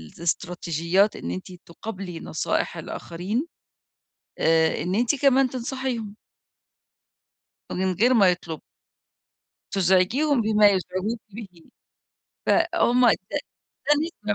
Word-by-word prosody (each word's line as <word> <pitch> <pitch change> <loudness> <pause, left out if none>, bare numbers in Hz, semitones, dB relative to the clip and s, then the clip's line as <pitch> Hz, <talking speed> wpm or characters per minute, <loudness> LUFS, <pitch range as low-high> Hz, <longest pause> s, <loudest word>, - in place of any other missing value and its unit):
الإستراتيجيات 175 +2 0
إن 85 - -5
أنتِ 95 - -6
تُقابلي 185 -1 -7
نصائح - - -2
الآخرين 190 - -4 0.9
آآ 160 -1 +3
إن 180 +3 -1
أنتِ 240 +5 +2
كمان 270 -1 +3
تنصحيهم. 245 -4 -4 1.6
من 185 0 0
غير 240 +8 +3
ما 200 -6 +6
يطلبوا. 170 -3 -3 1.1
تزعجيهم 200 - +2
بما 215 -1 +5
يزعجوكِ 190 +3 -1
بِه. 215 +1 -8 1.0
فهُم 330 -8 +3
ده 185 - -2 0.9
ده 210 - +1
200 Hz, 90 wpm, -24 LUFS, 180-240 Hz, 1.6 s, ما